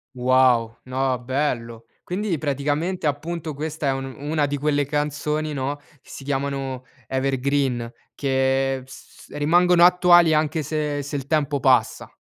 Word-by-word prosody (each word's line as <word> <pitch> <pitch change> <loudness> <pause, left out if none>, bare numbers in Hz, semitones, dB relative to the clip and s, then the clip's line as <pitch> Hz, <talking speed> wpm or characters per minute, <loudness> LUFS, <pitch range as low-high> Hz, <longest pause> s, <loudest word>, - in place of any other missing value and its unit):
Wow, 125 -2 +3
no, 130 0 -1
bello. 120 -3 -3 0.2
Quindi 185 -1 -2
praticamente 150 +5 -2
appunto, 155 +2 -3
questa 155 +1 -4
è - - +3
un 135 0 -5
una 150 +1 -1
di 145 0 -2
quelle 145 0 0
canzoni 150 +1 -2
no, 140 +1 -2 0.3
che - - -22
si - - -9
chiamano 135 -2 -3 0.2
evergreen, 135 -2 -1 0.2
che 135 -1 0
s 130 - -14
rimangono 175 +4 +4
attuali 175 -2 +6
anche 155 +1 +1
se 150 -1 -2
se 145 +1 -6
il 135 -1 -7
tempo 145 -2 0
passa. 130 -2 +2
145 Hz, 135 wpm, -23 LUFS, 130-155 Hz, 0.3 s, attuali